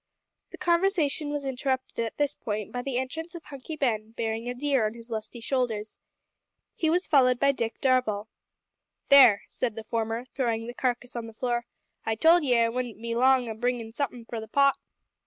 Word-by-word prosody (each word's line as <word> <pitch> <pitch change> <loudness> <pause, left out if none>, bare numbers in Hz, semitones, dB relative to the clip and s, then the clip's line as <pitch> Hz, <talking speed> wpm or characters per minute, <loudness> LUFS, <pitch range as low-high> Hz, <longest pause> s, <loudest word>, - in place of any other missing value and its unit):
The - - -10
conversation 340 -4 +1
was 290 -1 -3
interrupted 260 -1 -2
at 225 - -5
this 290 -1 +1
point 210 -5 -4
by 245 - -3
the 255 -1 -3
entrance 320 +7 -4
of 335 - -8
Hunky 280 +3 -8
Ben 225 -6 -1
bearing 225 +1 -3
a 245 - -3
deer 270 -4 +1
on 215 - -6
his 235 0 -11
lusty 220 +2 -5
shoulders. 230 -4 -2 0.8
He 320 - +1
was 355 +3 +2
followed 255 -4 +4
by 280 0 +4
Dick 230 -4 -3
Darvall. 250 -6 +1 0.8
"There," 255 -8 +8
said 235 -4 -2
the 225 - -6
former, 225 +2 -2
throwing 230 -3 -2
the 240 - -6
carcass 250 -1 -2
on 235 -1 -4
the 225 - -11
floor, 240 +1 -2 0.4
"I 225 - -1
told 325 +7 +5
ye 250 -4 +3
I 230 0 +3
wouldn't 240 -2 -4
be 230 0 -3
long 255 +1 +4
o' 225 - -3
bringin' 245 +1 -1
in 225 - -12
somethin' 245 -3 -3
for 230 0 -5
the 220 - -8
pot." 275 +4 +4
245 Hz, 195 wpm, -27 LUFS, 225-275 Hz, 0.8 s, There